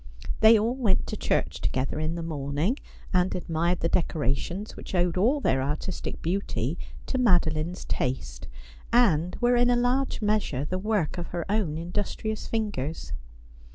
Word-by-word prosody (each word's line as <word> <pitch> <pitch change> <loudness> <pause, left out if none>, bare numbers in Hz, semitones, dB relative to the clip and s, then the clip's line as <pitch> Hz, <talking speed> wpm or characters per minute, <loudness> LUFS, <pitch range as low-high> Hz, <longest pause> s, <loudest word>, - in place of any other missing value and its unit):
They 220 +1 +8
all 225 +3 +1
went 235 -8 +1
to - - -4
church - - -1
together 130 +3 -1
in 155 +2 -1
the 170 - -4
morning, 155 - -1 0.3
and 180 0 +2
admired 170 0 0
the 165 - +2
decorations, 170 - -1
which - - -7
owed 175 -1 +2
all 235 +11 +3
their 130 - +2
artistic 150 +7 -3
beauty 165 - -1 0.3
to 260 - -1
Madeline's 175 -6 +2
taste, - - -3 0.4
and 180 -8 +3
were 245 0 +4
in 245 0 +4
a 245 - +4
large 250 +3 +1
measure 210 - 0
the 185 +4 -2
work 200 -5 0
of 170 - -4
her 170 -2 -4
own 195 -8 0
indus 175 +5 -2
trious 220 -1 -4
fingers. 165 - -2
180 Hz, 155 wpm, -27 LUFS, 155-215 Hz, 0.4 s, They